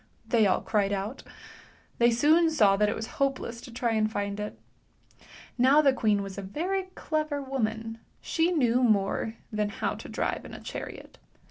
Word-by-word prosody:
" -, -, -34 dB
they 225 Hz, -4 st, +5 dB
all 185 Hz, -, +2 dB
cried 205 Hz, -2 st, 0 dB
out. 200 Hz, +6 st, -3 dB, 0.8 s
Thev 235 Hz, 0 st, +5 dB
soon 310 Hz, +8 st, +4 dB
saw 210 Hz, -11 st, +4 dB
that 210 Hz, +1 st, +2 dB
it -, -, -1 dB
was 220 Hz, -, -4 dB, 0.2 s
hopeless 260 Hz, -4 st, -1 dB
to -, -, -11 dB
try 235 Hz, 0 st, -1 dB
and 215 Hz, -1 st, +1 dB
find 200 Hz, -1 st, -3 dB
it. 210 Hz, 0 st, -5 dB, 1.0 s
N 250 Hz, -, +4 dB
w 290 Hz, +4 st, +6 dB
the 275 Hz, -2 st, +5 dB
queen 210 Hz, -5 st, +1 dB
was 195 Hz, 0 st, -7 dB
a -, -, -4 dB
very 355 Hz, -, -2 dB
clever 305 Hz, -2 st, -2 dB
woman; 225 Hz, -4 st, -3 dB, 0.2 s
she 330 Hz, +1 st, 0 dB
knew 250 Hz, -7 st, +2 dB
more 220 Hz, -1 st, +1 dB, 0.2 s
than 210 Hz, -1 st, 0 dB
how 205 Hz, -, -2 dB
to -, -, -9 dB
drive -, -, -2 dB
in -, -, -9 dB
a -, -, -8 dB
chariot. -, -, -8 dB
230 Hz, 190 wpm, -28 LUFS, 210-275 Hz, 1.0 s, w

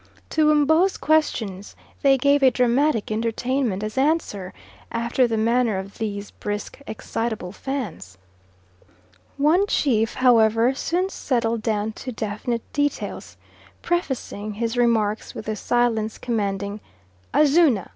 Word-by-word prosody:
To 310 Hz, -1 st, +3 dB
M'bo's 315 Hz, +6 st, +3 dB
questions 220 Hz, -11 st, 0 dB, 0.3 s
they 275 Hz, -1 st, +5 dB
gave 280 Hz, +2 st, +3 dB
a 265 Hz, -, +7 dB
dramatic 250 Hz, -1 st, +1 dB
entertainment 230 Hz, -1 st, -1 dB
as 215 Hz, +5 st, -3 dB
answer, 270 Hz, -, 0 dB, 0.4 s
after 235 Hz, +2 st, +1 dB
the 225 Hz, -1 st, -1 dB
manner 230 Hz, -1 st, +2 dB
of 195 Hz, +3 st, -7 dB
these 205 Hz, -2 st, -4 dB
brisk, 205 Hz, +5 st, -5 dB
excitable 220 Hz, -3 st, -4 dB
Fans. 205 Hz, -, -5 dB, 1.2 s
One 330 Hz, +8 st, +3 dB
chief, 225 Hz, -, +1 dB
however, 230 Hz, -1 st, +4 dB
soon 355 Hz, +7 st, -1 dB
settled 235 Hz, -, -1 dB
down 215 Hz, -1 st, -1 dB
to 255 Hz, -, -5 dB
definite 220 Hz, +1 st, -3 dB
details, 290 Hz, 0 st, -2 dB, 0.5 s
prefacing 265 Hz, -, -2 dB
his 230 Hz, +2 st, -2 dB
remarks 225 Hz, -3 st, +1 dB
with -, -, -7 dB
the 215 Hz, -, -2 dB
silence 225 Hz, -1 st, 0 dB
commanding 205 Hz, -3 st, -2 dB, 0.5 s
"Azuna! 295 Hz, -, +4 dB
235 Hz, 115 wpm, -23 LUFS, 215-275 Hz, 1.2 s, a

